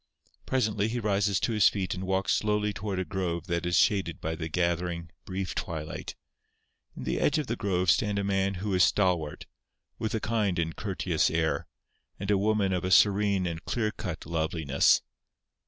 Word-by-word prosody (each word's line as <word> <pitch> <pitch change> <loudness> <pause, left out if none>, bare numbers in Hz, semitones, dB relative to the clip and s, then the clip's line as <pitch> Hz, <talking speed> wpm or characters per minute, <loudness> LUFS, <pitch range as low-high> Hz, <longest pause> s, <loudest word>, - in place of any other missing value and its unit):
Presently 110 -5 +1
he 120 +2 -2
rises 100 -3 +1
to - - 0
his 105 -3 +5
feet 95 -3 -2
and 95 0 -5
walks 95 -1 +1
slowly 105 -1 +1
toward 100 -2 -4
a 95 - -1
grove 85 -1 -3
that 85 -1 -1
is 90 - +2
shaded 95 -6 +2
by 80 - -3
the 80 0 -4
gathering, 85 0 -1
brief 95 0 -3
twilight. 80 -2 -5 0.8
In - - -6
the - - -1
edge 145 - +2
of 150 - -1
the 115 - -2
grove 95 -5 +2
stand 105 +5 +1
a 100 - 0
man 100 0 0
who 100 +2 -3
is 90 -1 +5
stalwart, 90 -7 +1 0.5
with 110 -1 -2
a - - 0
kind 105 -5 0
and 80 -1 -1
courteous 90 -5 0
air, 80 -1 0 0.5
and 100 +1 -2
a 100 - +4
woman 105 -2 +1
of 90 - -1
a 95 - -1
serene 100 0 +4
and 85 -2 -4
clear 110 -3 -1
cut - - -6
loveliness. 80 -3 +2
95 Hz, 185 wpm, -28 LUFS, 85-105 Hz, 0.8 s, his